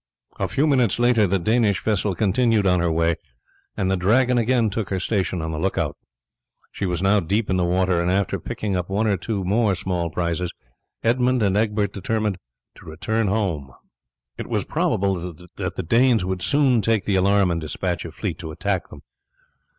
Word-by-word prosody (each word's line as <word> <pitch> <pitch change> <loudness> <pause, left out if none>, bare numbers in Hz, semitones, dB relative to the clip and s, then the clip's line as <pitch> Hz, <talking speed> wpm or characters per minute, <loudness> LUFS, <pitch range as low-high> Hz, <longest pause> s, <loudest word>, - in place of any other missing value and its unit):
A - - 0
few 145 - +1
minutes 130 -8 +2
later, 120 -3 +3
the 95 +2 +1
Danish 110 +1 +1
vessel 105 -3 0
continued 110 +2 +2
on 90 -1 +3
her 85 -1 +1
way, 85 0 +1 0.6
and 95 -1 0
the - - +3
Dragon 120 +8 +3
again 115 -2 +2
took 105 -1 -3
her 95 - -1
station 95 -3 -1
on 80 - -3
the 75 - -4
look 95 +4 -1
out. - - -1 0.8
She 95 - -3
was 90 0 -2
now 100 +2 +4
deep 100 +4 -1
in 95 - +2
the 90 - +1
water, 90 0 +1
and 85 - 0
after 95 0 0
picking 100 -3 -3
up 90 0 -2
one 105 +3 0
or 105 -2 +2
two 100 +2 -3
more 100 +2 +2
small 90 -2 -2
prizes, 85 +1 -2 0.5
Edmund 125 +1 +2
and 100 -1 +2
Egbert 105 -2 0
determined 105 -1 -2 0.4
to - - -15
return 105 +7 -1
home. 90 -10 -1 0.7
It - - -5
was - - -1
probable 90 -3 -1 0.2
that - - -3
the - - -3
Danes 115 +2 +3
would 95 -1 -3
soon 135 - +3
take 110 -2 +1
the 100 - +1
alarm 100 0 +3
and 85 -1 -2
despatch 85 +3 -3
a 85 - -6
fleet 90 -1 -4
to 80 - -6
attack 95 +4 -2
them. - - -12
100 Hz, 195 wpm, -22 LUFS, 90-110 Hz, 0.8 s, now